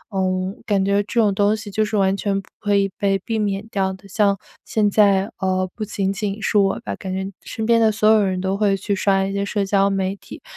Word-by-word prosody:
嗯， 185 +1 -1
感 195 -3 +1
觉 200 0 +2
这 215 +3 -2
种 210 -3 +3
东 205 +2 +2
西 205 -1 -8
就 215 - +1
是 215 0 -1
完 195 -1 +2
全 200 -1 -1
不 195 - -12
可 205 -1 +1
以 200 0 +3
被 195 -1 +2
避 225 -2 -1
免 200 0 -1
掉 195 -4 0
的。 195 +1 -14
像 200 0 +2 0.3
现 210 -2 +1
在， 200 -1 +3
呃， 185 -1 0
不 220 - -5
仅 195 -2 -2
仅 205 0 -3
是 210 0 +2
我 195 -1 +2
吧， 100 -1 -5
感 190 - -7
觉 190 +1 -3
身 220 - -5
边 230 0 +4
的 220 -1 +4
所 215 0 +1
有 215 -2 +5
人 185 -1 -1
都 190 +1 -1
会 200 -2 +2
去 200 +1 -2
刷 195 0 +2
一 195 - -3
些 200 0 -1
社 200 0 -1
交 195 0 +2
媒 195 0 -1
体。 200 - -12
200 Hz, 265 characters per minute, -21 LUFS, 195-210 Hz, 0.3 s, 有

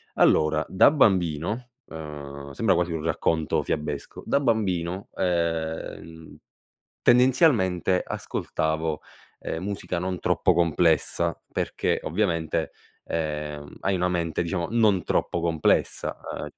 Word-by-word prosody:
Allora, 75 0 +3
da 95 - +6
bambino, 105 - +1 0.2
uhm, 70 -3 -8
sembra 95 +5 +2
quasi 90 -1 0
un 80 -2 -3
racconto 80 -1 0
fiabesco, 75 -2 -4
da 140 - +2
bambino, 95 -7 -1
ehm, 80 -2 -3 0.7
tendenzialmente 120 - +4
ascoltavo, 80 0 -2 0.4
ehm, 80 - -4
musica 100 -3 -3
non 90 0 -3
troppo 90 - +2
complessa 85 0 +2
perché - - -1
ovviamente, 85 -7 -1 0.3
ehm, 75 -2 -4
hai 95 - 0
una 90 0 +1
mente, 85 -3 -1
diciamo, 85 0 -2
non 110 -6 +3
troppo 85 - 0
complessa, 85 -2 +1 0.2
uhm, - - -5
85 Hz, 110 wpm, -25 LUFS, 80-95 Hz, 0.7 s, da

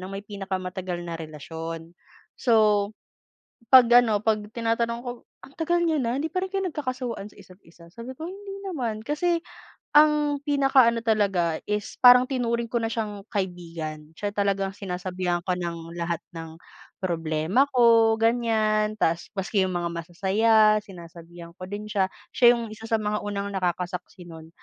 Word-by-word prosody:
na 185 - -7
may 195 +1 -7
pinakamatagal 185 -3 -5
na 165 -1 -6
relasyon. 165 +2 -7 0.4
So, 215 -4 +2 0.8
'pag 255 -3 +9 0.2
ano, 210 -3 +1
'pag-tinatanong 230 +2 -1
ko, 245 0 -5 0.3
"Ang 275 - -15
tagal 345 +1 +1
niyo 325 -2 +1
na, 255 0 -1
hindi 320 - -2
pa 370 +1 -2
rin 380 - -8
kayo 385 -1 -1
nagkakasawaan 255 - -5
sa - - -22
isa't-isa?" 170 -2 -18
Sabi 235 +8 -9
ko, 315 +6 -7
"Hindi 395 +1 -8
naman." 255 - -3
Kasi 330 +8 0 0.5
ang 295 -1 +4
pinakaano 270 -5 +3
talaga 195 -7 +1
is 210 0 -3
parang 250 0 +8
tinuring 235 -3 -2
ko 235 - +1
na 225 - -1
siyang 210 -3 -4
kaibigan, 165 -5 -5
siya 205 -1 -3
talagang 195 -1 0
sinasabihan 180 -2 -3
ko 185 - 0
ng 170 -2 -5
lahat 170 -1 -3
ng 165 -1 -8 0.5
problema 165 - +1
ko, 230 -3 +5
ganyan. 220 -2 +1
Tas 165 -4 0
maski 190 0 0
'yung 180 - -3
mga 170 -1 -2
masasaya, 210 +5 +3
sinasabihan 170 -3 -12
ko 185 +2 -10
din 205 +1 -5
siya. 200 -3 0 0.2
Siya 240 -1 +6
'yung 230 -2 -5
isa 225 +1 -9
sa 225 - +2
mga 210 -1 -2
unang 200 -1 -4
nakakasaksi 180 0 -3
nun 160 -1 -11
210 Hz, 155 wpm, -25 LUFS, 175-235 Hz, 0.8 s, pag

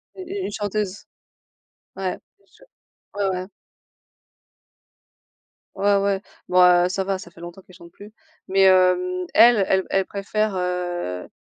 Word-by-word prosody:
U 380 - -9
u 380 +2 -5
une - - -4
chanteuse. 205 -1 -4 0.9
Ouais. 190 -1 -3 0.2
Mais 200 - -32
je - - -23 0.6
ouais, 195 - +1
ouais. 185 - -8 2.3
Ouais, 200 +1 +2
ouais. 195 0 0 0.3
Bon, 180 0 +3
heu, 180 0 +5
ça 190 +1 -2
va, 195 0 -2
ça 175 - -11
fait 170 - -16
longtemps 175 +2 -10
qu'elle 185 -1 -19
chante 170 -1 -15
plus. 205 +4 -14 0.4
Mais, 195 +1 +1
hem, 180 -1 +3
elle, 235 -3 +6
elle 190 -1 +1
elle 195 0 +1
préfère, 205 +1 -2
heu, 175 - -3
190 Hz, 145 wpm, -22 LUFS, 180-200 Hz, 2.3 s, elle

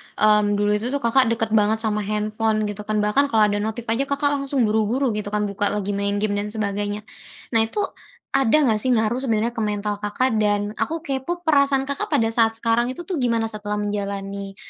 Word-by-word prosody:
mmm, 210 -1 +3
dulu 205 0 +1
itu 210 +3 0 0.2
Kakak 250 +2 +4
dekat 225 -1 -1
banget 220 +1 +2
sama 215 -1 0
handphone, 215 +1 -1
gitu 210 0 -5
kan, 215 -1 0
bahkan 240 +8 +3
kalau 220 -5 +3
ada 205 - 0
notif 220 +3 -3
aja 265 +5 0
Kakak 285 +1 +1
langsung 275 -2 0
buru-buru, 220 +4 +1
gitu 210 -1 -3
kan, 210 - +1
buka 205 0 0
lagi, 205 -1 -2
main 200 0 -1
game 205 0 0
dan 205 - -3
sebagainya. 205 -1 -3 0.5
Nah, 230 - +3
itu 415 - -2 0.5
ada 270 0 +3
nggak, 220 -5 +2
sih, 255 +4 0
ngaruh 220 +2 +1
sebenernya 230 -3 0
ke 240 - -7
mental 210 -1 -2
Kakak, 220 +3 0
dan 205 -1 +1
aku 315 +9 -2
kepo 340 +4 -3
perasaan 280 -3 +3
Kakak 280 0 -3
pada 225 0 +1
saat 225 -1 +2
sekarang 230 +1 +1
itu 260 +7 -5
tuh 345 -2 -3
gimana 230 -3 0
setelah 210 -1 -4
menjalani, 200 -1 -4
215 Hz, 200 wpm, -22 LUFS, 210-245 Hz, 0.5 s, Kakak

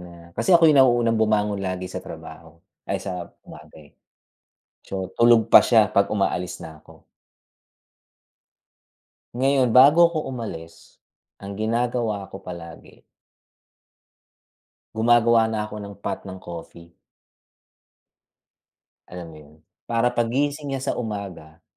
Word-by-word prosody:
na 90 -1 -12 0.2
kasi 185 - +2
ako 165 -2 +6
'yung 145 - +4
nauunang 120 -3 +3
bumangon 105 -2 +1
lagi 95 -1 -4
sa - - -5
trabaho. 85 0 -12 0.2
Ay, - - -2
sa 90 -3 -5 0.2
bagay. 75 -2 -15 0.9
So, 95 -1 -6
tulog 115 -2 +4
pa - - +10
siya, 110 -3 +3
'pag 100 0 +2
umaalis 90 -4 -2
na 80 -1 -11
'ko. - - -19 2.3
Ngayon, 130 0 +1
bago 150 +8 +6
'ko 155 -2 -4
umalis, 90 -10 -9 0.4
ang 100 0 -8
ginagawa 115 -2 -2
ko - - -9
palagi 85 -2 -11 1.9
gumagawa 115 0 +4
na 110 -1 -3
ako 105 - -11
ng 100 -1 -9
pot - - -4
ng 95 0 -8
coffee. 85 0 -11 2.2
Alam 90 -2 -9
mo - - -13
'yon, 75 +1 -18 0.3
para 120 +1 +1
paggising 140 +5 -1
niya 135 - -4
sa - - -6
umaga 95 -8 -7
105 Hz, 120 wpm, -23 LUFS, 90-120 Hz, 2.3 s, pa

